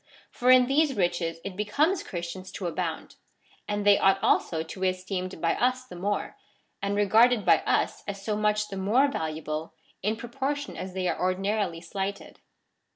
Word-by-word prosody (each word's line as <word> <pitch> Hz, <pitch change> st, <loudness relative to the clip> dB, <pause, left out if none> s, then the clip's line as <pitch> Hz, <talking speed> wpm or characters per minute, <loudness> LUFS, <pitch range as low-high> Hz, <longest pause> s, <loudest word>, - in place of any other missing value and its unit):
For 250 Hz, -, 0 dB
in 255 Hz, -1 st, +8 dB
these 275 Hz, +1 st, +2 dB
riches 175 Hz, -3 st, 0 dB
it 185 Hz, -, -5 dB
becomes 285 Hz, -, +1 dB
Christians 180 Hz, +1 st, -6 dB
to 190 Hz, -, -5 dB
abound; 170 Hz, -, -4 dB, 0.5 s
and 205 Hz, 0 st, -2 dB
they 205 Hz, -1 st, +6 dB
ought 195 Hz, 0 st, +4 dB
also 160 Hz, -7 st, +2 dB
to 165 Hz, +4 st, -9 dB
be 190 Hz, 0 st, +2 dB
esteemed 185 Hz, -1 st, -4 dB
by 165 Hz, +1 st, +1 dB
us 255 Hz, +1 st, 0 dB
the 240 Hz, -, -11 dB
more, 200 Hz, +3 st, -2 dB, 0.4 s
and 200 Hz, 0 st, -1 dB
regarded 220 Hz, +3 st, +4 dB
by -, -, +6 dB
us -, -, +1 dB
as 200 Hz, -1 st, -4 dB
so 210 Hz, +2 st, -2 dB
much 210 Hz, 0 st, +1 dB
the 195 Hz, -, -6 dB
more 230 Hz, +9 st, +3 dB
valuable, 155 Hz, -, -4 dB, 0.3 s
in 210 Hz, +3 st, 0 dB
proportion 275 Hz, +5 st, -4 dB
as 185 Hz, 0 st, -6 dB
they 185 Hz, -1 st, -1 dB
are -, -, -2 dB
ordinarily 185 Hz, -1 st, 0 dB
slighted. 195 Hz, +3 st, -5 dB
200 Hz, 170 wpm, -27 LUFS, 185-225 Hz, 0.5 s, in